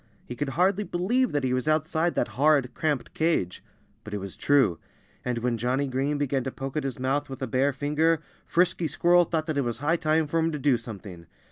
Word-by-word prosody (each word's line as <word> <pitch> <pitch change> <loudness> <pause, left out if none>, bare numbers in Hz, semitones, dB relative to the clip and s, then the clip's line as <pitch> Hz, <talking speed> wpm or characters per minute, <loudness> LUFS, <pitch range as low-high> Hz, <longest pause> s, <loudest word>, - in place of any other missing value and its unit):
He 120 - -7
could 145 +2 -2
hardly 190 +3 +3
believe 225 +8 0
that 145 -2 -1
he 130 -1 +1
was 130 +3 -1
outside 160 +2 +1
that - - 0
horrid, 140 -2 +2
cramped 155 -5 -2
cage. 155 - 0 0.4
But 105 -1 -6
it - - -1
was 100 -1 -7
true! 130 - +3 0.4
And 125 -1 -2
when 120 0 -1
Johnnie 125 +4 0
Green 135 +3 -1
began 140 -2 0
to 135 - -2
poke 135 +2 -6
at 155 - -1
his 135 -3 -3
mouth 135 +3 -1
with 135 0 -6
a - - -1
bare 130 +4 +2
finger 150 +4 +1 0.3
Frisky 175 -1 +2
Squirrel 175 +3 +4
thought 160 -1 -1
that 155 -3 -1
it - - +1
was 120 -2 -2
high 150 +6 +1
time 155 0 +2
for 165 +3 -1
him 165 0 +1
to - - -2
do 140 -2 +3
something. 100 -7 -8
145 Hz, 225 wpm, -26 LUFS, 125-160 Hz, 0.4 s, Squirrel